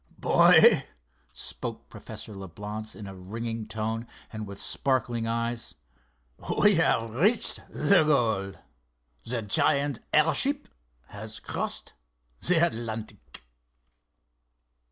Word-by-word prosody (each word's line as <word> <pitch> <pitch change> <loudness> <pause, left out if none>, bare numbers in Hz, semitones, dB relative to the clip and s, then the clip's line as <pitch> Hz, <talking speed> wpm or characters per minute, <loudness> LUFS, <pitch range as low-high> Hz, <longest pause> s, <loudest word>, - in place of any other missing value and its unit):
"Boy," - - +6 0.5
spoke - - -5
Professor 110 - -9
Leblance, 105 +3 -7
in 105 - -9
a 95 - -8
ringing 110 +4 -5
tone 110 +1 -3 0.3
and 110 -1 -5
with 100 0 -9
sparkling 120 -4 0
eyes, 115 +1 -3 0.8
"we 205 0 +6
have 115 -9 +2
reached 205 - +2
goal! 120 -10 +2 0.7
The 115 -1 -2
giant 140 +6 +2
airship 265 - +3 0.4
has 110 +1 -7
crossed - - -4 0.5
the 170 -1 +4
Atlantic!" 110 - -6
115 Hz, 95 wpm, -27 LUFS, 105-140 Hz, 0.8 s, Boy